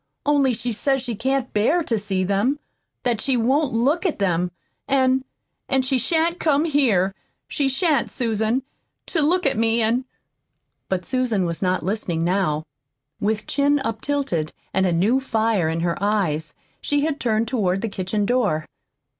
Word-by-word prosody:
Only 280 -4 +3
she 240 +2 -3
says 270 +4 0
she 245 -2 -3
can't 265 +4 -1
bear 290 +12 +2
to 235 - -1
see 200 -3 -1
them, 200 +9 +1 0.5
that 235 -3 0
she 265 -2 +1
won't 265 +5 +2
look 270 +9 +1
at 365 -6 0
them. 180 -3 +1 0.4
And 260 -1 +3 0.5
and 265 -1 +2
she 260 0 +1
shan't 335 +4 +1
come 300 0 +2
here 230 - +2 0.3
she 280 -3 0
shan't, 305 +1 +1
Susan, 230 +1 0 0.4
to 325 - -1
look 350 +4 +2
at 270 -5 +1
me, 230 0 +2
and 235 +3 +1 0.4
" - - -53
But 185 -2 -1
Susan 235 -4 0
was 170 -1 -3
not 185 -2 +1
listening 180 -4 -1
now. 170 -4 0 0.5
With 215 +1 -1
chin 285 +1 +2
up 225 -6 -3
tilted 270 - -1 0.2
and 190 0 +2
a - - +1
new 200 +10 +3
fire 220 -9 +1
in 165 +1 -1
her 170 +1 -1
eyes, 195 -7 0 0.3
she 290 0 +1
had 310 -2 -2
turned 225 -1 +1
toward 195 -6 0
the 230 - -1
kitchen 200 +1 -2
door. 205 -10 +1
230 Hz, 170 wpm, -22 LUFS, 195-270 Hz, 0.5 s, Only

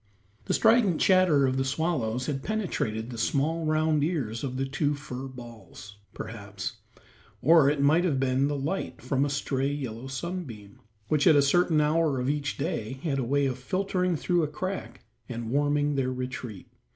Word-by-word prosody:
The - - +1
strident 220 -6 +4
chatter 185 -7 +4
of 130 0 0
the 135 - +1
swallows 130 -4 -1
had 135 -1 -2
penetrated 125 - -2
the 115 - -6
small 155 +6 0
round 155 -1 +2
ears 130 -9 -2
of 130 -2 -3
the 135 - 0
two 145 +2 0
fur 135 -2 -7
balls, 115 -5 -11 0.2
perhaps, - - -6 0.6
or 160 -3 +6
it 145 -1 0
might 155 +5 +4
have 150 -7 +1
been 135 +1 +2
the 145 0 -1
light 155 +8 -3
from 135 0 0
a - - -1
stray 140 -1 -1
yellow 130 -4 -5
sunbeam, 135 - -6 0.3
which 150 +5 +2
at 160 - +7
a 145 - +6
certain 165 +2 +3
hour 150 -2 +2
of 125 +2 +1
each 145 0 -3
day 140 -7 -3
had 140 -5 0
a - - 0
way 140 +4 +1
of 130 -1 -2
filtering 185 +4 0
through 175 +3 +1
a 155 - 0
crack 150 -7 -5 0.2
and 115 -2 -5
warming 145 +1 +1
their 130 -2 0
retreat. 125 -5 -6
140 Hz, 175 wpm, -27 LUFS, 130-160 Hz, 0.6 s, at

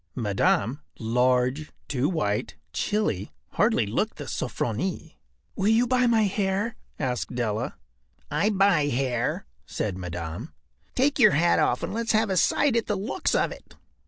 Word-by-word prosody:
Madame, 130 - +1 0.2
large, 125 +5 +1 0.2
too 140 +2 0
white, 105 - -1 0.2
chilly, 205 - -1 0.2
hardly - - +2
looked - - -1
the - - -6
“Sofronie.” 120 - -3 0.4
“Will 195 - 0
you 225 +3 +4
buy 250 0 +2
my 225 -2 +4
hair?” 200 +2 0 0.2
asked 125 -2 -2
Della. 110 -3 -2 0.6
“I 210 - +2
buy 195 -7 +3
hair,” 125 - -1 0.2
said 95 -3 -3
Madame. 90 - -6 0.4
“Take 275 +3 +2
yer 215 -4 +8
hat 170 0 +3
off 125 - +1
and - - -3
let’s 230 0 0
have 215 -1 +2
a 190 - +1
sight 265 +7 +3
at 230 - +1
the 210 - 0
looks 220 - -1
of - - +2
it. - - -12
155 Hz, 150 wpm, -26 LUFS, -, 0.6 s, yer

